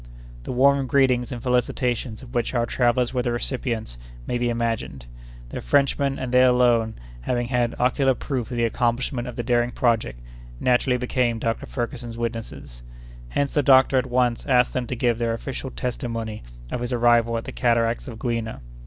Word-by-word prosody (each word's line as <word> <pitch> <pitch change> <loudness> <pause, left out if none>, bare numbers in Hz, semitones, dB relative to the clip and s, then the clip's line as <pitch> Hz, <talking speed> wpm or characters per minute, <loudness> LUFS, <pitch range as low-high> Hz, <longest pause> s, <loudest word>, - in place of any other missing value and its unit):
The - - -4
warm 135 +1 +3
greetings 125 -2 +2
and 120 -2 -6
felicitations 125 -1 -1
of 125 0 -12
which 120 +1 -1
our 120 -1 +2
travellers 120 +1 +1
were 125 - +1
the 120 -1 -1
recipients 120 - -3 0.3
may 120 - -2
be 120 0 +1
imagined. 115 - -2 0.4
The - - -5
Frenchmen, 140 -1 +1
and 130 -2 -4
they 125 0 +5
alone, 120 -3 +3 0.3
having 120 - -1
had 120 -2 0
ocular 130 +1 +2
proof 125 -3 -3
of 125 - -4
the 120 - +1
accomplishment 120 +2 0
of 125 - -7
the 120 - -3
daring 120 0 +2
project, 115 - 0 0.4
naturally 125 0 +2
became 125 -1 0
Dr. 115 0 -2
Ferguson's 120 -2 -5
witnesses. 115 - -5 0.5
Hence 140 - -1
the 145 - +3
doctor 135 0 +5
at 130 - -3
once 125 -1 +1
asked 125 -3 +3
them 125 -2 -2
to 125 - -3
give 120 -1 +1
their 115 -1 0
official 130 +3 -5
testimony 115 -4 -4 0.3
of 120 - -3
his 120 +1 -3
arrival 120 -1 +3
at 115 - -4
the - - -6
cataracts 115 +1 +1
of 115 -3 -7
Gouina. 115 - -3
120 Hz, 180 wpm, -24 LUFS, 115-125 Hz, 0.5 s, they